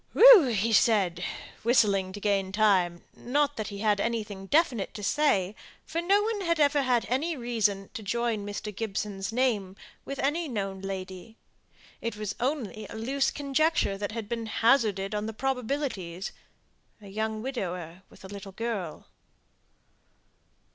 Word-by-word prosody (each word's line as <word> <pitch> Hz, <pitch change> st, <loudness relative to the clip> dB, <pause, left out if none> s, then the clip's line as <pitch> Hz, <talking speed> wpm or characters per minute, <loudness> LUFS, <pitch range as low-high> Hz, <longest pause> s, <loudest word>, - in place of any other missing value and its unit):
"Whew," 255 Hz, -, +7 dB
said 200 Hz, -6 st, +3 dB
he, -, -, -3 dB, 0.4 s
whistling 200 Hz, -5 st, +3 dB
to 205 Hz, -, -6 dB
gain 195 Hz, -2 st, 0 dB
time; 190 Hz, -4 st, +2 dB
not 290 Hz, +3 st, 0 dB
that 215 Hz, -, -4 dB
he 200 Hz, -, -6 dB
had 210 Hz, -2 st, +2 dB
anything 210 Hz, -4 st, -3 dB
definite 275 Hz, -, +1 dB
to 210 Hz, -, -6 dB
say, 200 Hz, -7 st, +2 dB, 0.3 s
for 330 Hz, +1 st, -2 dB
no 395 Hz, +4 st, +3 dB
one 435 Hz, -1 st, -1 dB
had 335 Hz, -3 st, 0 dB
ever 290 Hz, -1 st, +4 dB
had 250 Hz, -3 st, +1 dB
any 300 Hz, +6 st, -1 dB
reason 220 Hz, -5 st, -1 dB
to -, -, -6 dB
join 225 Hz, 0 st, -1 dB
Mr. 205 Hz, 0 st, -5 dB
Gibson's 200 Hz, -2 st, -3 dB
name 225 Hz, -6 st, 0 dB, 0.3 s
with 275 Hz, -, -6 dB
any 310 Hz, +5 st, 0 dB
known 195 Hz, -6 st, -3 dB
lady: 190 Hz, +2 st, -6 dB, 0.6 s
it 230 Hz, -2 st, -3 dB
was 210 Hz, -1 st, -3 dB
only 245 Hz, -5 st, -2 dB
a -, -, -8 dB
loose 265 Hz, +5 st, 0 dB
conjecture 290 Hz, -5 st, +1 dB
that 205 Hz, +1 st, -4 dB
had 225 Hz, -2 st, -5 dB
been 230 Hz, 0 st, -3 dB
hazarded 220 Hz, -4 st, +2 dB
on 210 Hz, +1 st, -2 dB
the 220 Hz, -, -5 dB
probabilities 250 Hz, -, -3 dB, 0.7 s
a 205 Hz, -, -13 dB
young 220 Hz, +2 st, -3 dB
widower, 180 Hz, -9 st, -4 dB
with -, -, -15 dB
a -, -, -7 dB
little 195 Hz, 0 st, -9 dB
girl. 205 Hz, -7 st, -4 dB
220 Hz, 150 wpm, -28 LUFS, 195-265 Hz, 0.7 s, Whew